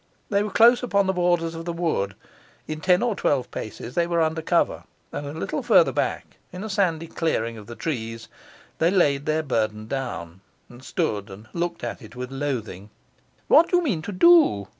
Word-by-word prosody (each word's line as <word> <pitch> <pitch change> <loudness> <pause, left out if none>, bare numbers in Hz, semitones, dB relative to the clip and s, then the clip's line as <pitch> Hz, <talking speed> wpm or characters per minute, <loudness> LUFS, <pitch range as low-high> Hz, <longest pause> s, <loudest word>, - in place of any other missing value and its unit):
They 200 0 +3
were 210 - -2
close 235 +4 +5
upon 200 -5 +1
the 190 - +1
borders 175 -2 +1
of 165 0 -7
the 175 - -2
wood; 160 - -1 0.5
in 155 0 -5
ten 180 +3 +3
or 235 -4 0
twelve 135 -8 0
paces 115 +2 -7
they 170 -1 +1
were 170 -1 0
under 160 0 +1
cover; 170 +1 0 0.3
and 145 - -5
a - - -5
little 160 - -3
further - - +5
back, - - -3
in 180 +2 -7
a 220 - -5
sandy 175 -5 +1
clearing 135 -9 -2
of 105 -2 -11
the 120 - -8
trees, 115 -7 -4 0.5
they 165 - +4
laid 145 -7 +2
their 155 +1 +1
burthen 110 -5 -1
down, 95 -9 -5 0.3
and 120 +1 -14
stood 110 - -2
and 100 +3 -11
looked 170 -2 -3
at 120 - -4
it 110 +2 -13
with 125 +1 -6
loathing. 120 -8 -4 0.6
'What 335 - +6
do 355 - +4
you 355 - +1
mean 205 - -1
to 180 - -6
do? 205 - +5
160 Hz, 200 wpm, -24 LUFS, 115-180 Hz, 0.6 s, What